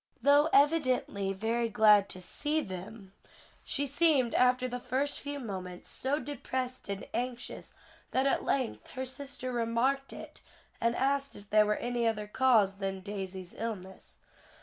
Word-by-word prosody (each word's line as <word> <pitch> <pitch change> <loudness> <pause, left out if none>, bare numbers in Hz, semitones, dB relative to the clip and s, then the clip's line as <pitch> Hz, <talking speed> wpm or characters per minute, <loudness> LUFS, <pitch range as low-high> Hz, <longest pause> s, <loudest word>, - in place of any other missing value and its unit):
Though 290 +2 +5
evidently 255 -9 +2
very 225 +4 -1
glad 210 -2 +5
to 185 - -5
see 295 - -1
them, 195 -1 -8 0.5
she 285 - -1
seemed, 285 -4 +3
after 250 0 +3
the 250 0 -4
first 260 +4 -1
few 285 0 -4
moments, 185 -7 -6
so 270 +3 -1
depressed 260 -4 -4
and 200 0 -4
anxious, 245 +1 -4 0.4
that 260 +1 +1
at 275 - +2
length 260 -4 -1
her 260 0 -3
sister 260 -1 -6
remarked 245 +4 0
it, - - -10 0.4
and 235 +1 +2
asked 275 +1 0
if 205 0 -13
there 210 0 +5
were 210 - +2
any 240 0 -1
other 210 -2 -1
cause 210 -3 +3
than 195 -1 -3
Daisy's 190 -2 -6
illness. 200 -4 -6
240 Hz, 150 wpm, -31 LUFS, 205-270 Hz, 0.5 s, Though